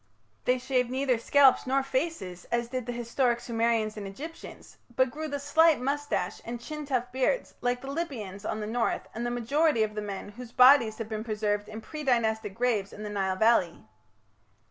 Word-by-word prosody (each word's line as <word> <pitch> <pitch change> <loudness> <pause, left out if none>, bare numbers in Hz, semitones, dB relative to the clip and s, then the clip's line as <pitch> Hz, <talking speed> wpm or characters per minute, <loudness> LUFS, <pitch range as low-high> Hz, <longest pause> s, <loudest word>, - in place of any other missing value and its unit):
They 250 +1 +3
shaved 250 -1 0
neither 260 -2 +1
scalps 270 +1 +5
nor 270 +1 +2
faces 260 - -3
as 235 0 -1
did 255 -2 -4
the - - -2
historic 240 +1 0
Sumerians 230 -2 0
and 205 -2 -6
Egyptians, 300 +12 -10 0.2
but 260 0 +3
grew 310 +3 -5
the 285 -1 -3
slight 305 +3 +4
moustache 280 -7 -2
and 235 +1 -5
chin 300 +4 -7
tuft 250 -3 -1
beard 265 - +1
like 245 0 0
the 270 +1 -6
Libyans 230 - -5
on 215 +1 -3
the - - -3
north 230 +2 -1
and 235 +2 -3
the - - -1
majority 245 +2 +2
of 215 -1 -2
the 210 - -3
men 205 -1 -6
whose 235 +3 -10
bodies 250 -3 +6
have 225 - -5
been 220 -1 -4
preserved 210 -2 -1
in 220 +1 -7
pre 305 +5 -7
Dynastic 220 -5 +1
graves 230 -5 0
in 210 - -9
the 210 - -5
Nile 190 -2 0
valley. 220 -5 +2
240 Hz, 190 wpm, -28 LUFS, 215-270 Hz, 0.2 s, bodies